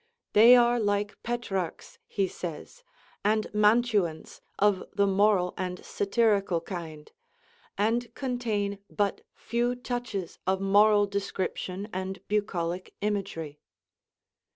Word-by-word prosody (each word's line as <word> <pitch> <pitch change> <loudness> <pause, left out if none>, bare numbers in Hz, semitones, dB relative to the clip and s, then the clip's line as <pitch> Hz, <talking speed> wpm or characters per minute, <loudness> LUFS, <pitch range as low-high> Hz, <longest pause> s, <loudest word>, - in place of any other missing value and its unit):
"They 230 +4 +9
are 240 0 +4
like 205 -1 -1
Petrarch's," 215 -7 -4
he 195 -2 0
says, 175 - -8 0.4
"and 215 +1 +2
Mantuans 210 -6 +2 0.2
of 205 -2 +3
the 200 0 +2
moral 195 -2 +3
and 180 -1 -4
satirical 200 -4 +1
kind; 165 -4 -8 0.7
and 230 +4 0
contain 220 -6 -2
but 205 -2 -1
few 240 +1 -1
touches 245 -7 -4
of 190 0 +2
moral 205 +1 +5
description 195 -1 -3
and 190 0 -5
bucolic 185 -4 -2
imagery." 175 -8 -3
205 Hz, 105 wpm, -28 LUFS, 185-220 Hz, 0.7 s, They